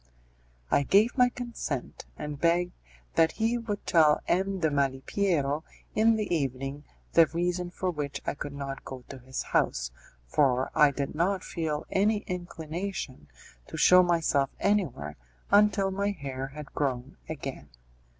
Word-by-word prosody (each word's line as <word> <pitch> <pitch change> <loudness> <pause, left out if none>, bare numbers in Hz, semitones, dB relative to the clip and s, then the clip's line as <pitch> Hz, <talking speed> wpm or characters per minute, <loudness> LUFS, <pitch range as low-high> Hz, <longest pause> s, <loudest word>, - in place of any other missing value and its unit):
I - - +5
gave 205 - +4
my 250 -2 +5
consent, 235 - -5
and 150 -1 -6
begged 175 +1 +3 0.4
that 165 0 +4
he 230 +2 +1
would 210 -3 -4
tell 155 -3 +5
M. 190 +2 +1
de 160 -3 +1
Malipiero 145 +2 0 0.3
in 225 +1 +4
the 210 -5 0
evening 135 0 -3 0.3
the 165 -1 +7
reason 175 +1 -1
for 185 +1 -2
which 145 -4 -4
I - - 0
could 145 0 -6
not 135 -1 -5
go 130 -2 -8
to 135 - -8
his 130 +1 -5
house, - - 0 0.3
for 130 - +2
I 150 - +6
did 140 0 -3
not 185 +4 0
feel 155 -3 -3
any 205 +2 +2
inclination 175 - -5 0.4
to - - -7
show 180 0 +7
myself 165 -6 +2
anywhere 145 - 0 0.3
until 205 -1 +4
my 200 +1 0
hair 135 -8 -4
had 145 +1 -10
grown 135 -1 -2
again. 140 -4 -6
160 Hz, 145 wpm, -28 LUFS, 140-195 Hz, 0.4 s, the